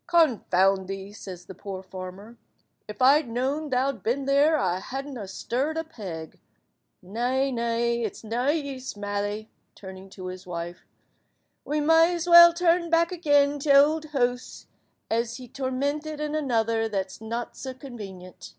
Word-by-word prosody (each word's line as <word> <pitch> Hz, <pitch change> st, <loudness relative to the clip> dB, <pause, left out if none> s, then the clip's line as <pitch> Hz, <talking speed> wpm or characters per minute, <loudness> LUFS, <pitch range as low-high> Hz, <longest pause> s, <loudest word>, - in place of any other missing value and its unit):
"Confound 195 Hz, -, +3 dB
thee," 195 Hz, +1 st, -6 dB
says 185 Hz, -4 st, -9 dB
the -, -, -9 dB
poor 190 Hz, 0 st, -7 dB
farmer, 190 Hz, +4 st, -9 dB, 0.5 s
"if 210 Hz, +4 st, -4 dB
I'd 280 Hz, 0 st, +5 dB
known 270 Hz, +6 st, -2 dB
thou'd 260 Hz, 0 st, 0 dB
been 265 Hz, +4 st, -1 dB
there 285 Hz, +3 st, +4 dB
I 185 Hz, -7 st, 0 dB
wadn't 270 Hz, +1 st, -5 dB
ha 210 Hz, -5 st, -6 dB
stirrid 260 Hz, +10 st, -2 dB
a 325 Hz, -, -1 dB
peg. 180 Hz, -, -8 dB, 0.6 s
Nay, 250 Hz, +7 st, 0 dB
nay, 235 Hz, 0 st, 0 dB
it's 220 Hz, -4 st, -4 dB
to 220 Hz, -, -12 dB
na 240 Hz, +4 st, -1 dB
use, 280 Hz, -6 st, -2 dB
Mally," 205 Hz, +1 st, -3 dB, 0.2 s
turning 190 Hz, 0 st, -11 dB
to 190 Hz, -1 st, -10 dB
his 185 Hz, +1 st, -7 dB
wife, 175 Hz, 0 st, -6 dB, 0.8 s
"we 300 Hz, +1 st, -1 dB
may 325 Hz, +3 st, +5 dB
as 340 Hz, 0 st, -3 dB
weel 340 Hz, 0 st, +10 dB
turn 340 Hz, 0 st, +2 dB
back 335 Hz, +1 st, +3 dB
again 290 Hz, -4 st, +2 dB
to 285 Hz, -, -4 dB
t'ould 295 Hz, +3 st, +5 dB
hoose, 250 Hz, -4 st, -2 dB, 0.5 s
as 230 Hz, +1 st, 0 dB
be 255 Hz, -1 st, -10 dB
tormented 285 Hz, +4 st, -3 dB
in 300 Hz, 0 st, -3 dB
another 230 Hz, -6 st, 0 dB
that's 195 Hz, 0 st, -4 dB
not 230 Hz, +2 st, -5 dB
sa 260 Hz, -1 st, -6 dB
convenient." 200 Hz, -, -10 dB
245 Hz, 155 wpm, -26 LUFS, 200-290 Hz, 0.8 s, weel